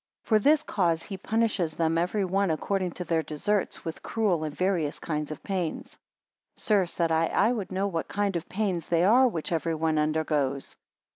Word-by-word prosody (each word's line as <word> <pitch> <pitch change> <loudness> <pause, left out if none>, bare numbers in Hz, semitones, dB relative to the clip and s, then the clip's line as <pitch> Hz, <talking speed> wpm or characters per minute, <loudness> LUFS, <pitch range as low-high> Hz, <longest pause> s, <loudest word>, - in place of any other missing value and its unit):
For 215 -2 +3
this 300 +7 +4
cause 170 - 0
he 200 - -6
punishes 205 -5 0
them 165 -1 +1
every 180 +4 +1
one 195 +1 +1
according 180 +3 -1
to 180 - -5
their 165 -1 +1
deserts, 195 +7 -2
with 165 - -5
cruel 200 -8 0
and 150 -1 -4
various 180 -5 0
kinds 150 -2 -3
of 155 - -7
pains. 180 -5 -3 0.7
22 - - -19
Sir, 205 -4 +3
said 170 -1 -1
I, 160 0 +3
I 215 +8 +2
would 215 -7 -3
know 190 +2 0
what 165 -5 -2
kind 200 -2 -1
of 170 0 -4
pains 190 -4 -1
they 170 0 +3
are 245 +7 +6
which 170 -10 -3
every 165 0 0
one 160 -1 +1
undergoes? 150 -3 -1
175 Hz, 195 wpm, -27 LUFS, 160-200 Hz, 0.7 s, are